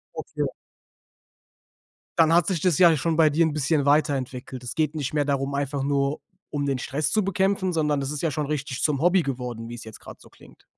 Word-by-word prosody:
Okay. - - -3 1.7
Dann 165 -1 +5
hat 170 0 +5
sich 180 -6 -1
das 180 -5 +2
ja 170 -3 +6
schon 160 +3 0
bei 155 -1 +5
dir 165 +3 +3
'n 155 - -1
bisschen 150 0 +1
weiterentwickelt. 135 -4 0
Es 120 - -6
geht 155 -1 0
nicht 145 -1 -3
mehr 145 -2 +1
darum, 140 0 -1
einfach 140 0 -2
nur 140 +1 0 0.3
um 145 -1 -1
den 135 -2 0
Stress 145 +4 -2
zu 215 - +2
bekämpfen, 190 -1 0
sondern 150 -3 +1
das 135 +1 -3
ist 150 - -4
ja 165 - +1
schon 150 0 -2
richtig 140 -3 -3
zum 145 -2 +1
Hobby 175 0 +4
geworden, 125 -4 -5
wie's 120 0 -8
jetzt 110 -1 -11
gerade - - -12
so - - -17
klingt. - - -19
145 Hz, 210 wpm, -25 LUFS, 135-160 Hz, 1.7 s, ja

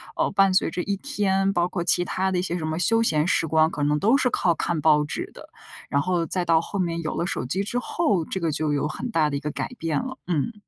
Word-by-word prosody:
呃， - - +1
伴 195 -1 +3
随 - - +2
着 180 +2 -3
一 200 - -1
天， 195 -6 0
包 175 0 +1
括 180 -1 -3
其 175 +1 +3
他 190 +1 -1
的 180 - 0
一 - - +1
些 175 - -2
什 155 - -3
么 160 0 -2
休 225 +7 +3
闲 155 -6 +2
时 165 - +2
光， 160 +1 +3
可 145 - -5
能 150 +1 +2
都 220 - +3
是 260 -2 +2
靠 175 -7 +1
看 165 0 -2
报 150 -1 +4
纸 150 - -5
的。 - - -13 0.4
然 140 0 +1
后 175 -3 0
再 180 +1 -1
到 165 -1 +3
后 200 +3 -5
面 170 -2 -1
有 155 - -4
了 - - -1
手 175 - -2
机 190 +10 -1
之 245 +4 -2
后， 240 - 0
这 190 - -4
个 165 -3 -1
就 150 0 0
有 145 +1 0
很 245 +11 -5
大 160 -8 +2
的 - - -2
一 - - -4
个 150 +2 -4
改 - - -4
变 160 -3 -1
了， 260 +1 -6
嗯。 175 +7 -1
175 Hz, 300 characters per minute, -24 LUFS, 155-195 Hz, 0.4 s, 报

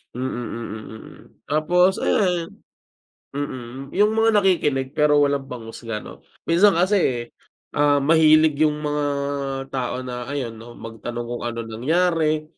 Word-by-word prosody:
Mm, 130 +1 -2
mm, 120 -2 -5 0.3
mm. 110 - -11 0.4
Tapos 180 +5 +3
ayan 180 -4 0 0.8
mm, 135 -1 -6
yung 210 +2 +4
mga 225 -2 +3
nakikinig 145 -8 +1
pero 150 0 +3
walang 140 -1 0
panghusga 115 -2 -7
'no, - - -11 0.2
minsan 180 +3 +4
kasi, 170 - +1 0.4
um, 145 -1 +2
mahilig 155 -1 +5
yung 150 - -1
mga 150 0 -1 0.7
tao 130 -1 -3
na 125 -1 -6
ayun 125 -6 -4
'no, 120 +1 -12
magtanong 115 +1 -6
kung 120 - -4
anong 115 -1 -5
nangyari, 160 +1 +1
145 Hz, 130 wpm, -22 LUFS, 120-165 Hz, 0.8 s, mahilig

